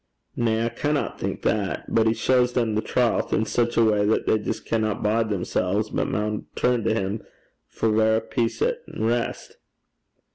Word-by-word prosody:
'Na, 115 -1 +1
I - - 0
canna 150 +3 -1
think - - -4
that. 100 -2 -1
But 115 0 +2
he 110 - +2
shaws 125 0 +2
them 115 -3 +1
the 105 - +1
trowth 120 0 0
in 110 - +1
sic 120 +1 0
a 115 - +5
way 105 -2 +3
that 105 +2 +1
they 110 - +2
jist 110 +2 -4
canna 110 -2 0
bide 110 +1 0
themsel's, 100 +1 -1
but - - 0
maun 105 +1 -2
turn 125 -2 +1
to 110 - +2
him 100 0 -2 0.5
for - - -2
verra 110 +1 +3
peace 115 +1 -1
an' 485 0 +1 0.2
rist.' 115 +2 -2
110 Hz, 180 wpm, -24 LUFS, 105-120 Hz, 0.5 s, a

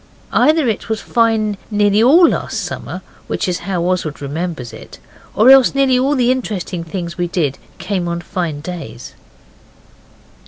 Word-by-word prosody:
Either 310 -3 +3
it 220 -1 -2
was 220 -1 -1
fine 220 -3 +1
nearly 205 0 +2
all 320 +9 +7
last - - -2
summer, - - -6 0.2
which - - -2
is 180 -1 -1
how 180 -3 0
Oswald 175 -4 -1
remembers 145 -4 -5
it, 110 - -12 0.4
or 235 +5 +6
else 270 -1 +6
nearly 265 -2 +3
all 275 +3 +1
the 250 -2 +3
interesting 200 -8 -3
things 170 0 -6
we 175 - 0
did 160 -6 -1 0.2
came 185 -4 -2
on 170 0 -2
fine 170 -4 -4
days. 165 -7 -8
190 Hz, 155 wpm, -17 LUFS, 170-240 Hz, 0.4 s, all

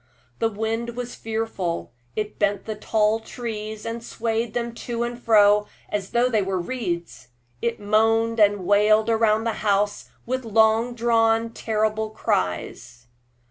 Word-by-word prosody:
The 225 - +2
wind 225 +2 -3
was 245 0 -5
fearful; 220 -6 -3 0.2
it 210 -1 -4
bent 205 -1 +1
the 220 - -3
tall 215 +1 +1
trees, 220 -2 -6
and 230 0 -4
swayed 225 -1 -2
them 235 -1 -2
to 235 0 -3
and 240 0 -5
fro 210 -2 +5 0.2
as 200 -2 -3
though 240 +1 +2
they 220 -4 +1
were 190 -1 -1
reeds. 175 - -4 0.3
It 235 -1 -1
moaned 225 +2 +2
and 205 -3 +4
wailed 210 +3 +4
round 220 -1 +2
the 230 - 0
house 205 0 0 0.2
with 255 +2 -2
long 225 +2 +3
drawn, 225 -1 +2
terrible 220 -1 -1
cries. 120 - -3
220 Hz, 140 wpm, -24 LUFS, 210-230 Hz, 0.3 s, fro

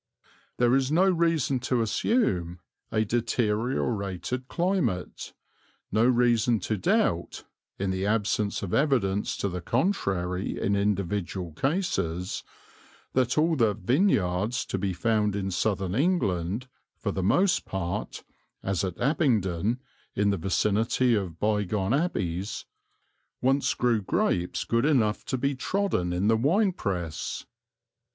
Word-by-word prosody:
There 120 0 +3
is 135 +1 +1
no 175 +5 +4
reason 165 -7 +2
to 125 -1 0
assume 95 - 0 0.3
a 110 0 +1
deteriorated 115 0 -1
climate, 170 - -1 0.6
no 110 +4 +3
reason 120 -2 +3
to 110 - -1
doubt 90 - 0 0.3
(in 95 -1 -1
the 95 +1 -1
absence 105 -1 0
of 95 - -4
evidence 115 -9 +1
to - - -1
the 90 -2 -4
contrary 95 - -1
in 100 - +1
individual 100 -3 -1
cases) 90 - -1 0.7
that 130 +1 +1
all 160 +2 +3
the 115 -7 +2
"vineyards" 110 - +1
to 95 - -3
be 95 0 -1
found 105 +2 +1
in 95 -1 -2
Southern 95 -1 -1
England, 110 - 0 0.3
for - - -2
the 95 - -2
most 180 - +2
part, 90 -3 -4 0.4
as 95 -1 -1
at 90 -3 -4
Abingdon, 120 - +1 0.3
in 100 0 +2
the 100 - 0
vicinity 105 +7 +1
of 95 -6 -2
bygone 105 0 0
abbeys, 100 - -1 0.7
once 135 +2 +2
grew 120 -3 +2
grapes 90 -2 0
good 115 +3 +1
enough 115 -8 +2
to 130 - -1
be 140 +3 0
trodden 140 - -1
in 90 +3 0
the 110 0 +4
wine 185 - +3
press. 90 - -4
110 Hz, 125 wpm, -27 LUFS, 95-130 Hz, 0.7 s, no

